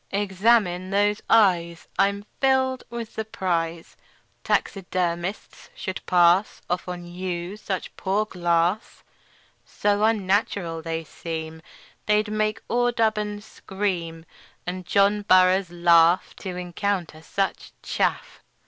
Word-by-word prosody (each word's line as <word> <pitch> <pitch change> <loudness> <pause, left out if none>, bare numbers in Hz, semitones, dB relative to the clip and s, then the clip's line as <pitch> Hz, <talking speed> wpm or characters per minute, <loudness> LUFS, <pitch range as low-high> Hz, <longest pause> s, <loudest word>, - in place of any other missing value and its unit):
"Examine 195 -2 +2
those 205 +1 +1
eyes. 175 -6 +3
I'm 200 +1 +2
filled 260 -1 +2
with 235 -1 -6
surprise 170 -6 -3 0.5
Taxidermists 180 0 -2
should 190 -1 -5
pass 180 +3 +4
Off 180 +1 -2
on 180 -1 -6
you 175 +1 -5
such 195 -3 -5
poor 200 +3 0
glass; 175 +1 0 0.6
So 205 0 0
unnatural 200 -5 +1
they 165 0 -3
seem 160 0 -6 0.5
They'd 210 0 +2
make 215 0 -1
Audubon 220 -4 0
scream, 185 -6 -4 0.4
And 180 0 -5
John 200 +2 +3
Burroughs 185 -1 +4
laugh 170 0 +4
To 185 -3 -6
encounter 180 -2 -3
such 195 +5 -3
chaff. - - -2
190 Hz, 105 wpm, -24 LUFS, 175-210 Hz, 0.6 s, pass